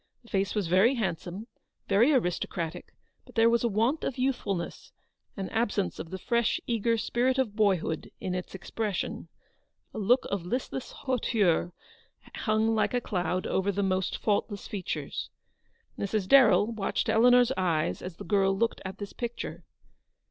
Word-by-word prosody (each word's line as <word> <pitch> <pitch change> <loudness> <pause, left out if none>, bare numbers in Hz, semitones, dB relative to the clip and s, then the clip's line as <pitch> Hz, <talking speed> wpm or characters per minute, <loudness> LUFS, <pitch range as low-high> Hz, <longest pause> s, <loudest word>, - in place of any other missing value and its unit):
The 235 - -18
face 195 +1 0
was 205 -3 0
very 190 +10 +4
handsome, 190 -2 -3 0.4
very 220 +8 +4
aristocratic, 175 - -2 0.3
but - - -18
there 230 0 +5
was 235 0 +2
a - - +3
want 230 +8 +1
of 270 - -2
youthfulness, 245 -9 -2 0.5
an 195 -1 -3
absence 215 -4 -1
of 165 - -6
the 190 - -5
fresh, 235 +4 +1
eager 230 0 +1
spirit 250 +4 +1
of 240 -6 0
boyhood 190 -7 +1
in 185 - -3
its 180 +1 -5
expression. 205 +1 -3 0.7
A - - -5
look 245 +5 +3
of 200 -3 -1
listless 250 +6 -3
hauteur 215 - +1 0.6
hung 220 0 +1
like 220 +3 +1
a - - +3
cloud 185 -4 -2
over 190 +1 0
the 200 +1 -1
almost 185 -1 0
faultless 205 -1 -1
features. 195 -3 -4 0.7
Mrs. 200 -1 -1
Darrell 235 -4 +6
watched 215 -4 -1
Eleanor's 245 +2 +5
eyes 155 - 0
as 180 -2 -7
the - - -8
girl 195 -2 +2
looked 230 +2 0
at 190 0 -6
this 205 0 -7
picture. 240 -1 -5
210 Hz, 155 wpm, -28 LUFS, 190-235 Hz, 0.7 s, Darrell